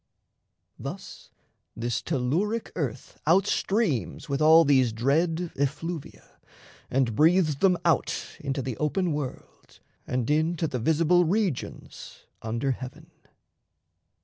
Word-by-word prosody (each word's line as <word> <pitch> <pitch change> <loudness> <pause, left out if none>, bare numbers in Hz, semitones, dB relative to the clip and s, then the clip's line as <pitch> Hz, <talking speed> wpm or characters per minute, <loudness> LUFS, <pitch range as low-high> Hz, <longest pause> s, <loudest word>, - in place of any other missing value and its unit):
Thus, - - -8 0.5
this 120 +1 -2
telluric 180 - -1
earth 130 -6 -5
Out 185 +4 +5
streams 200 - -1
with 140 +1 -2
all 160 +2 +7
these 130 -4 +4
dread 160 +9 0
effluvia 150 +4 -4 0.5
And 130 -3 +1
breathes 160 - +4
them 180 +2 +3
out 170 - 0
into 135 -2 -3
the 130 -2 -4
open 165 +3 0
world 145 -4 -7 0.3
And 125 -2 -1
into 160 +2 +1
the 125 - -3
visible 165 +7 +3
regions 185 - -3 0.2
under 115 +5 -1
heaven. 130 0 -8
150 Hz, 110 wpm, -26 LUFS, 130-175 Hz, 0.5 s, all